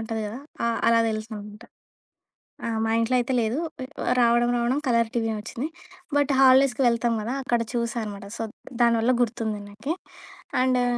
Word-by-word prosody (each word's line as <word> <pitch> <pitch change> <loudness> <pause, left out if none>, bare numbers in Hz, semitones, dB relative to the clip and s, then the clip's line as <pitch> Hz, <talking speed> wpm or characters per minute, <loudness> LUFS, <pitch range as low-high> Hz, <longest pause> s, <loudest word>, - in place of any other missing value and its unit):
ఉంటది 225 0 -3
గదా! 220 +5 -6 0.3
ఆహ్, 230 -1 +1
అలా 230 0 +5
తెలుసనమాట. 215 0 -6 1.0
ఆ! - - -1 0.2
మా 225 - 0
ఇంట్లో 230 +3 +1
అయితే 250 +2 -1
లేదు. 225 +7 0 0.6
రావడం, 240 0 +4
రావడం 240 +4 +1
కలర్ 230 -2 +2
టీవే 225 -2 0
వచ్చింది. 235 +6 -4 0.5
బట్ 285 0 +2
హాలిడేస్‌కి 265 0 +5
వెళ్తాం 235 0 +2
గదా! 240 +5 -3
అక్కడ 240 -2 +1
చూసా 235 0 -1
అనమాట. 200 -1 -7
సో, - - -2 0.4
దానివల్ల 235 +1 +4
గుర్తుంది 220 -3 -1
నాకి. 220 +10 -4 0.7
అండు 255 -1 +3
235 Hz, 150 wpm, -25 LUFS, 225-245 Hz, 1.0 s, అలా